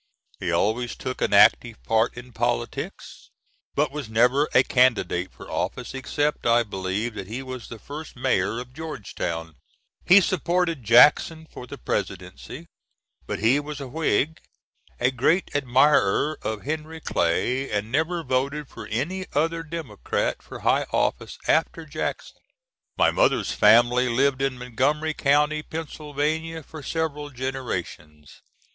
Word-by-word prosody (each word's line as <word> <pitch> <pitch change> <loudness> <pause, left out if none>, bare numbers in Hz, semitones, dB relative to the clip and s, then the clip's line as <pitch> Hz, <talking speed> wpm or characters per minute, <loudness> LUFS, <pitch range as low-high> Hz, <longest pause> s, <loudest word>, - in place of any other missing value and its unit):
He - - -2
always 120 +3 0
took 130 0 -5
an - - +1
active - - +5
part 110 - +1
in 120 0 -10
politics, - - -3 0.5
but - - +1
was 145 -5 -6
never 125 +6 +3
a 130 - +5
candidate 120 -9 +2
for - - -13
office, 125 - -3
except, 145 +1 -1
I 120 0 +4
believe, 100 +2 -3
that 95 -3 -7
he 120 +6 -5
was 130 -3 -7
the 115 - -8
first 150 +7 -9
Mayor 115 -4 0
of 125 0 -9
Georgetown. 90 - -5 0.5
He 190 +3 +8
supported 175 -4 0
Jackson 145 +8 +5
for 125 -5 -11
the - - -8
Presidency; 90 - -5 0.6
but - - -2
he 120 +6 +4
was 145 0 -6
a 135 - -6
Whig, 155 +1 0 0.6
a 125 +1 +2
great 150 +9 +1
admirer 145 -1 +3
of 110 -2 -4
Henry 155 +2 -4
Clay, 125 - 0
and 105 +1 -2
never 165 +4 0
voted 140 +2 -1
for - - -9
any 175 +12 -3
other 165 +3 +1
democrat 165 0 -3
for - - -10
high - - +2
office - - -1
after - - +1
Jackson. - - -5 0.6
My - - +4
mother's - - +2
family 120 +4 +5
lived 135 +2 +2
in 135 -2 0
Montgomery 135 +6 0
County, 150 +1 +2
Pennsylvania, 155 +1 -3
for 155 +2 -10
several 150 -1 -3
generations. 105 - -6
135 Hz, 140 wpm, -24 LUFS, 115-155 Hz, 0.6 s, He